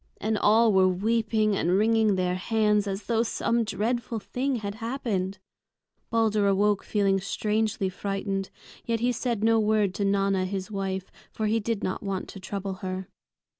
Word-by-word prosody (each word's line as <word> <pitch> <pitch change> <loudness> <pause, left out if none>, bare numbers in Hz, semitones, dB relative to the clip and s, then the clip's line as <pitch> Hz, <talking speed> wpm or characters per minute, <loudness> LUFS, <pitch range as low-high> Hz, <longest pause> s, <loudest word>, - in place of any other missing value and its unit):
And 220 +1 0
all 220 +1 +4
were 190 -1 +5
weeping 215 +2 +1
and 180 0 +2
wringing 220 -1 +3
their 180 -1 0
hands 210 +2 +1
as 195 +1 -3
though 225 +2 +1
some 235 0 0
dreadful 225 +3 -2
thing 260 +5 -2
had 205 -3 -4
happened. 220 -6 -2 0.7
Balder 215 -3 +2
awoke 200 +1 +2
feeling 195 -2 +1
strangely 210 +1 -1
frightened, 195 0 -3 0.3
yet 230 -1 -1
he 245 +1 +2
said 235 -3 -2
no 225 0 +4
word 210 -3 +2
to 200 - -2
Nanna 195 -1 +1
his 190 +2 -4
wife, 190 -2 -3 0.2
for 220 - -3
he 220 +2 +2
did 225 -1 -2
not 185 - -2
want 195 -2 -3
to 195 - -9
trouble 195 +1 -4
her. 185 0 -4
205 Hz, 165 wpm, -27 LUFS, 195-225 Hz, 0.7 s, were